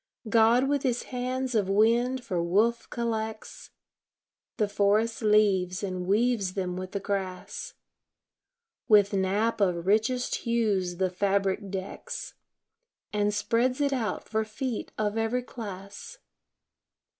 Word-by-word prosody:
God 230 +4 +4
with 285 -1 +1
His 245 -2 0
hands 255 0 -3
of 205 -4 +1
wind 235 +5 +3
for 180 -4 -1
woof 210 +7 +1
collects 220 -2 -4 0.9
The 210 - +2
forest 210 +3 +1
leaves, 205 -3 +3
and 185 -2 -3
weaves 210 -2 +1
them 180 -2 -2
with 185 0 -6
the 200 - -1
grass, 190 -2 -4 1.1
With 205 -2 +5
nap 200 +4 +1
of 175 -3 +1
richest 220 +5 +1
hues 210 -7 0
the 185 0 0
fabric 195 +1 0
decks, 190 0 -6 0.8
And 210 0 +1
spreads 235 +5 +1
it 285 -1 +1
out 235 -5 -2
for 220 0 0
feet 220 +2 -4
of 215 +1 0
every 235 +3 0
class. 210 - -8
215 Hz, 120 wpm, -28 LUFS, 195-235 Hz, 1.1 s, With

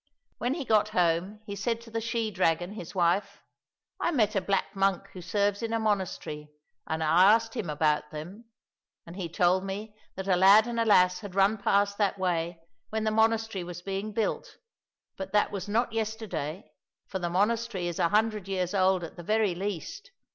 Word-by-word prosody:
When 245 +3 0
he 300 -5 -4
got 215 -2 +3
home, 180 +4 +1
he 200 -2 -6
said 225 +3 -1
to 230 -1 -14
the 225 0 -2
she 230 -1 -2
dragon, 175 -1 +1
his 185 -3 -9
wife, 195 +3 0 0.3
" - - -61
I - - +2
met 220 -9 +1
a 195 - +2
black 195 +1 -1
monk 195 -1 +1
who 185 - -8
serves 205 +3 0
in 230 0 -2
a 230 - +1
monastery, 190 -8 -2 0.4
and 160 0 -2
I 175 +6 +6
asked 225 0 -3
him 215 -9 -3
about 150 0 +1
them, 175 +10 -9 0.6
and 170 0 -10
he 185 -3 -4
told 180 +3 +2
me 205 +2 -5 0.2
that 190 0 -5
a 185 - +4
lad 195 +4 +7
and 235 -1 -3
a 230 - +2
lass 180 -4 +4
had 205 -4 -9
run 195 +2 +4
past 200 +1 +1
that 200 -1 +1
way 170 -2 -1 0.3
when 220 0 -2
the 215 - +1
monastery 220 -3 +1
was 175 0 -8
being 195 +2 -3
built, 215 0 -2 0.6
but 190 0 -6
that 210 - +3
was 200 0 -5
not 230 +2 0
yesterday, 210 -7 -4 0.3
for 190 - -5
the 175 -1 -2
monastery 205 +1 0
is 175 - -4
a 170 - +3
hundred 215 -1 +1
years 185 -2 -2
old 190 -2 +2
at 165 - -8
the 175 - -8
very 215 0 +1
least." 200 - -5
195 Hz, 200 wpm, -28 LUFS, 180-220 Hz, 0.6 s, lad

